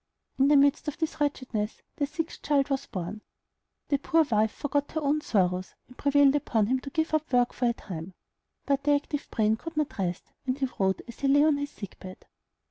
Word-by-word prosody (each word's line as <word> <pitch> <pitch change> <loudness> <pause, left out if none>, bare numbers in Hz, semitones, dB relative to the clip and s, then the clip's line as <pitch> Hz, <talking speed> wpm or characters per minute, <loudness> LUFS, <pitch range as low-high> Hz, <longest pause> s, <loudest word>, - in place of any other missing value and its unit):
In 270 - +5
the 295 0 +6
midst 280 +2 +3
of 295 - -3
this 320 -2 -3
wretchedness 250 -7 -2
their 285 - 0
sixth 325 +3 -5
child 285 -1 +1
was 270 - -1
born. 185 +3 -5 0.7
The 280 - +2
poor 325 +3 +3
wife 220 -6 +2
forgot 290 0 -2
her 315 - 0
own 295 +1 +1
sorrows, 185 -6 0
and 250 - -16
prevailed 280 0 +4
upon 225 -7 +1
him 255 +4 +1
to 275 - -8
give 320 +2 -1
up 310 -2 0
work 245 -1 +3
for 250 - -1
a - - +1
time; 180 -4 -8 0.5
but 280 0 +1
the 290 0 +4
active 290 0 -3
brain 220 0 +2
could 330 +5 -8
not 300 -8 -1
rest, 180 -2 -3 0.2
and 255 +1 0
he 270 -2 0
wrote 190 -1 +1
as 235 - -11
he 275 - 0
lay 285 +2 +5
on 305 -2 +4
his 285 0 -3
sick 200 -8 -10
bed. 185 0 -10
275 Hz, 215 wpm, -28 LUFS, 215-290 Hz, 0.7 s, the